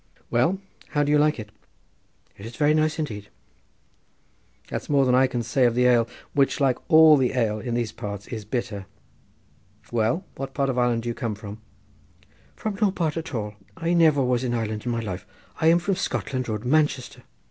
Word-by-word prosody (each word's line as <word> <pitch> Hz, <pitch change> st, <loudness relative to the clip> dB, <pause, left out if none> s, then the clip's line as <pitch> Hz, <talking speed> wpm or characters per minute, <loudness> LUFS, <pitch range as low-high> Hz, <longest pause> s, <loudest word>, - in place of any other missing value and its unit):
"Well, 130 Hz, +11 st, +2 dB, 0.3 s
how 145 Hz, -1 st, 0 dB
do 145 Hz, -, 0 dB
you 150 Hz, -, +5 dB
like 150 Hz, -2 st, +2 dB
it?" 105 Hz, -1 st, -8 dB, 0.8 s
"It's 115 Hz, +4 st, -9 dB
very 150 Hz, 0 st, +3 dB
nice 155 Hz, 0 st, +1 dB
indeed." 105 Hz, -10 st, -5 dB, 1.4 s
"That's -, -, -5 dB
more 140 Hz, -2 st, +4 dB
than 125 Hz, -, +2 dB
I 130 Hz, +1 st, +5 dB
can 120 Hz, -2 st, -3 dB
say 125 Hz, +3 st, +2 dB
of 120 Hz, -, -1 dB
the 125 Hz, 0 st, +3 dB
ale, 120 Hz, -2 st, +4 dB, 0.3 s
which, 140 Hz, -1 st, +2 dB
like 135 Hz, -3 st, +2 dB
all 160 Hz, -2 st, +8 dB
the 130 Hz, -2 st, +1 dB
ale 110 Hz, -4 st, 0 dB
in 120 Hz, +1 st, -3 dB
these 120 Hz, -3 st, -1 dB
parts, 100 Hz, -1 st, -6 dB
is 110 Hz, -3 st, -5 dB
bitter. 110 Hz, -4 st, -4 dB, 1.0 s
Well, 120 Hz, -, 0 dB
what 135 Hz, 0 st, -7 dB
part 140 Hz, -1 st, +1 dB
of 125 Hz, -, -5 dB
Ireland 120 Hz, -2 st, +1 dB
do 120 Hz, -, -3 dB
you -, -, -1 dB
come 115 Hz, -3 st, -3 dB
from?" 105 Hz, +1 st, -9 dB, 0.9 s
"From 210 Hz, -2 st, -4 dB
no 210 Hz, -, +5 dB
part 165 Hz, -5 st, -1 dB
at 160 Hz, -4 st, -5 dB
all. 105 Hz, -2 st, -3 dB, 0.2 s
I 165 Hz, +1 st, 0 dB
never 155 Hz, -5 st, +4 dB
was 125 Hz, 0 st, +1 dB
in 120 Hz, -1 st, -1 dB
Ireland 110 Hz, 0 st, -3 dB
in -, -, +1 dB
my 115 Hz, -1 st, -1 dB
life. 95 Hz, -5 st, -6 dB, 0.3 s
I 160 Hz, -, +1 dB
am 165 Hz, +1 st, +6 dB
from 175 Hz, +3 st, -1 dB
Scotland 130 Hz, -8 st, -2 dB
Road, 110 Hz, +1 st, -3 dB
Manchester." 145 Hz, -2 st, +1 dB
125 Hz, 195 wpm, -24 LUFS, 115-150 Hz, 1.4 s, all